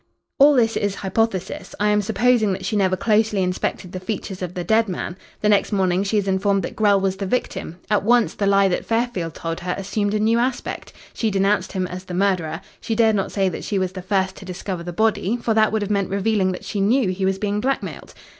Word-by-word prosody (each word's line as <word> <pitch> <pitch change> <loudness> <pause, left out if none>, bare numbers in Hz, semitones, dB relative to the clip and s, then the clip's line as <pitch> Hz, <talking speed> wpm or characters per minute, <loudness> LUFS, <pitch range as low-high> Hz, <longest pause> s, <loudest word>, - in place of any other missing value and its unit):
"All 285 +1 +7
this 225 -3 +3
is 205 -1 -1
hypothesis. 195 -1 -2
I 210 0 +2
am 210 0 +3
supposing 220 0 +2
that 185 0 -5
she 215 - -1
never 190 -2 +2
closely 210 -2 +2
inspected 180 0 -2
the 185 - -5
features 190 -1 -5
of 180 -1 -5
the 180 - -3
dead 220 +4 +2
man. 175 -1 -4 0.3
The 210 - +2
next 205 +1 +3
morning 190 -2 +2
she 205 +2 0
is 200 -1 0
informed 195 +1 +1
that - - -5
Grell 205 -2 +4
was 190 0 -1
the 195 0 -3
victim. 185 -6 -3
At 210 0 +2
once 235 +2 +3
the 200 - -1
lie 195 0 +4
that 180 - -1
Fairfield 225 -9 -1
told 165 0 -4
her 180 0 -3
assumed 205 +1 -1
a - - +1
new 225 +2 +3
aspect. 250 +1 -3 0.2
She 225 - 0
denounced 200 +1 +1
him 185 -2 -1
as 180 +1 -7
the 180 - -6
murderer. 180 -4 0 0.2
She 230 -1 -3
dared 220 -1 +4
not 195 - -1
say 195 -2 +1
that - - -6
she 205 - -2
was 185 -1 0
the 185 0 -7
first 190 0 0
to - - -10
discover 185 0 -5
the 175 +1 -5
body, 220 +3 +1
for 230 -1 0
that 215 0 +3
would 220 -1 0
have 205 - -3
meant 200 -2 0
revealing 200 -1 +1
that - - -8
she 205 - -2
knew 225 +1 +3
he 185 +1 -3
was 190 0 +1
being 205 +1 -1
blackmailed. 270 +3 -3
200 Hz, 240 wpm, -22 LUFS, 185-220 Hz, 0.3 s, All